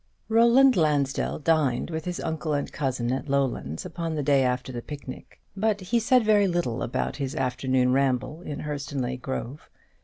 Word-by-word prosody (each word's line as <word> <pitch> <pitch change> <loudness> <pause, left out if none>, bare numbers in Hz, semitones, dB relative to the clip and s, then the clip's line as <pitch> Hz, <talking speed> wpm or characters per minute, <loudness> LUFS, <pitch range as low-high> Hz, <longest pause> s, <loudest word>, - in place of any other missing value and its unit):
Roland 235 +4 +6
Lansdell 145 -5 +1
dined 155 -3 +1
with 160 -1 -4
his 180 -1 -3
uncle 160 -1 -2
and 145 -1 -2
cousin 125 -4 -2
at 135 +2 -3
Lowlands 135 - -1
upon 165 -2 -4
the 150 - -1
day 140 -1 +4
after 125 0 -1
the 120 -1 -5
picnic; 140 -1 -9 0.2
but 210 +1 +1
he 205 +6 0
said 245 +2 +4
very 205 -2 +4
little 170 -10 -1
about 120 - -2
his 135 -2 -3
afternoon 130 0 +1
ramble 130 +3 0
in 150 -5 -6
Hurstonleigh 140 -4 -4
Grove. 130 +1 -5
145 Hz, 165 wpm, -26 LUFS, 130-170 Hz, 0.2 s, Roland